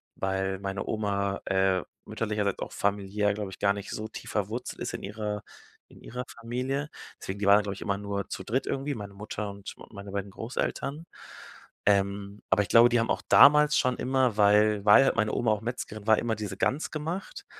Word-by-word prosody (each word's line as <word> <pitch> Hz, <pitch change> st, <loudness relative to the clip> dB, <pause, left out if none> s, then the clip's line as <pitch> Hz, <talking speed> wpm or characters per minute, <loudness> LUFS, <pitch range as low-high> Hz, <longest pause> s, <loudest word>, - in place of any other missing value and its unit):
weil 95 Hz, 0 st, -1 dB
meine 95 Hz, 0 st, -4 dB
Oma, 100 Hz, -2 st, -1 dB
äh, 95 Hz, -2 st, +2 dB, 0.2 s
mütterlicherseits, 105 Hz, -3 st, -2 dB
auch -, -, -5 dB
familiär, 100 Hz, 0 st, 0 dB
glaube 105 Hz, -2 st, -5 dB
ich, -, -, -11 dB
gar 100 Hz, -1 st, +3 dB
nicht 100 Hz, 0 st, -7 dB
so 110 Hz, -, -4 dB
tief 110 Hz, 0 st, -9 dB
verwurzelt 110 Hz, +4 st, -3 dB
ist -, -, -3 dB
in -, -, -8 dB
ihrer 105 Hz, 0 st, -4 dB, 0.5 s
in -, -, -17 dB
ihrer 125 Hz, +1 st, -6 dB, 0.2 s
Familie. 130 Hz, +5 st, -2 dB, 0.3 s
Deswegen, 95 Hz, -, -5 dB
die 105 Hz, -, -1 dB
waren 100 Hz, 0 st, +8 dB
dann, 105 Hz, -, +1 dB
glaube 100 Hz, -1 st, -3 dB
ich, -, -, -11 dB
immer 100 Hz, -1 st, -1 dB
nur 100 Hz, -1 st, -3 dB
zu -, -, -5 dB
dritt 120 Hz, +7 st, -1 dB
irgendwie, 140 Hz, +1 st, -2 dB
meine 100 Hz, -3 st, -7 dB
Mutter 105 Hz, 0 st, -5 dB
und 100 Hz, 0 st, -9 dB, 0.2 s
meine 100 Hz, -1 st, -9 dB
beiden 100 Hz, 0 st, -4 dB
Großeltern. 135 Hz, +7 st, -4 dB, 0.8 s
Ähm, 100 Hz, 0 st, +1 dB
aber 100 Hz, +2 st, +4 dB
ich -, -, -9 dB
glaube, 120 Hz, +1 st, +7 dB
die 120 Hz, -1 st, +3 dB
haben 115 Hz, -, 0 dB
auch -, -, -1 dB
damals 150 Hz, +1 st, +7 dB
schon 125 Hz, -2 st, +2 dB
immer, 130 Hz, -3 st, +1 dB
weil 105 Hz, 0 st, +4 dB
weil 105 Hz, +6 st, +8 dB
halt -, -, +2 dB
meine 110 Hz, -1 st, +2 dB
Oma 120 Hz, -2 st, +1 dB
auch 105 Hz, -1 st, 0 dB
Metzgerin 110 Hz, -3 st, -5 dB
war, 110 Hz, -1 st, +6 dB
immer 115 Hz, -1 st, -1 dB
diese 105 Hz, -2 st, -5 dB
Gans 140 Hz, +9 st, 0 dB
gemacht 165 Hz, +5 st, -5 dB
105 Hz, 200 wpm, -28 LUFS, 100-120 Hz, 0.8 s, waren